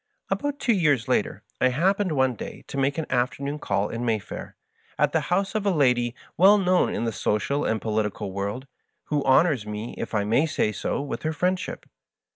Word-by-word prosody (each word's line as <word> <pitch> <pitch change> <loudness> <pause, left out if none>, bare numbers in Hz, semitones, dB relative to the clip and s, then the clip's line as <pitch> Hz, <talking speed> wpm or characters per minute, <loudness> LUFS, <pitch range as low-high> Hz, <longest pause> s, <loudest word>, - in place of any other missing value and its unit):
rv. - - -5
About 285 0 -3
two 240 - +2
years 145 - +2
later - - 0 0.2
I 130 - +5
happened 185 +7 +1
one 130 -2 +2
day 115 - -8
to - - -5
make 140 +2 +1
an 160 - -1
afternoon 140 +4 -1
call 100 -3 -1
in 115 +1 -4
Mayfair, 110 -4 -3 0.4
at - - +2
the - - +2
house 195 +4 +1
of 215 -2 -1
a 200 - +2
lady 125 -7 +2 0.2
well 195 +4 +7
known 185 -2 +2
in - - -2
the 115 - 0
social 110 +7 0
and 110 - 0
political 105 -2 -2
world, 100 +7 -4 0.4
who 145 -2 +1
honors 135 -4 +3
me, 105 +2 -5
if - - -4
I 105 - +2
may 115 +10 +2
say 125 -8 0
so, 140 - -2
with 145 - -5
her 155 0 -1
friendship. 180 +4 -2
135 Hz, 200 wpm, -25 LUFS, 110-175 Hz, 0.4 s, well